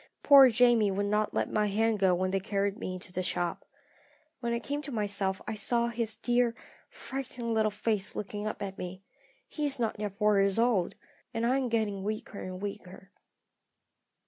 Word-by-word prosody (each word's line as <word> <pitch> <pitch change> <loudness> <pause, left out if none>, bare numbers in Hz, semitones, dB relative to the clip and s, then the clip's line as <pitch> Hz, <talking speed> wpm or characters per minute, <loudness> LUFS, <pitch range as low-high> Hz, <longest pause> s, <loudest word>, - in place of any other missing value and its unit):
Poor 275 -2 +9
Jamie 235 -2 +4
would 200 +1 -1
not 210 +1 +1
let - - 0
my 210 -1 +1
hand 220 +1 +1
go 190 -2 +4
when 185 +1 -1
they 195 - +1
carried 200 0 -1
me 185 - -5
into 185 0 -7
a - - +1
shop. 175 -1 -2 0.8
When 235 -2 -2
I 235 - +1
came 285 +5 -3
to 290 -1 -6
myself 200 -4 0
I - - -2
saw 235 +2 +1
his 230 -2 -1
dear, 240 0 +1 0.3
frightened 250 -3 -5
little 220 -1 +2
face 210 -1 -1
looking 210 +1 -4
up 215 - -4
at 195 -1 -6
me. 185 +1 -7 0.4
He 300 - -5
is 280 - -1
not 225 -3 -2
yet 205 -2 -4
four 210 -1 +3
years 195 0 +2
old 220 -6 +2 0.4
and 225 +1 0
I 255 +3 +3
am 255 -2 -1
getting 215 -4 0
weaker 215 0 -4
and 185 0 -6
weaker. 195 -1 -8
210 Hz, 190 wpm, -29 LUFS, 195-235 Hz, 0.8 s, Poor